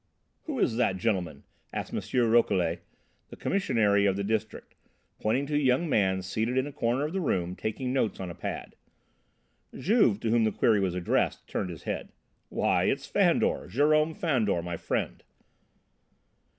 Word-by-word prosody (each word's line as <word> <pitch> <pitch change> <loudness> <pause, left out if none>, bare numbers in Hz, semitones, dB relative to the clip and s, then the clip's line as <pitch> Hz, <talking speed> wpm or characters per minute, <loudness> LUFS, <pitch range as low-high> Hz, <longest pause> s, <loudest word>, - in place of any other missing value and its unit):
"Who 300 -4 -4
is 115 - +1
that 95 -6 +1
gentleman?" 90 -8 -2 0.3
asked - - -5
M. - - -1 0.3
Rouquelet, 95 -8 +2 0.5
the - - -10
Commissary 110 - +2
of 95 - +2
the 100 - -2
district, 110 0 -3 0.5
pointing 125 +6 0
to 150 - -5
a - - +3
young 135 +4 +2
man 95 -8 +1
seated 110 +6 -1
in 130 - +2
a 145 - -6
corner 130 0 0
of 155 - -4
the 190 - -1
room, 90 - -1
taking 125 +6 -3
notes 120 -6 0
on 90 -2 -5
a - - -7
pad. - - -6 1.0
Juve, 190 - +3
to 115 - 0
whom 115 -1 +3
the 110 - +2
query 110 -3 +3
was 95 -2 0
addressed, 90 -1 0
turned 95 - -3
his 85 - -9
head. - - -4 0.4
"Why, - - +1
it's - - 0
Fandor, - - +2
Jerome 155 - +2
Fandor, 125 - 0
my 85 0 -4
friend." - - -3
110 Hz, 165 wpm, -28 LUFS, 95-135 Hz, 1.0 s, a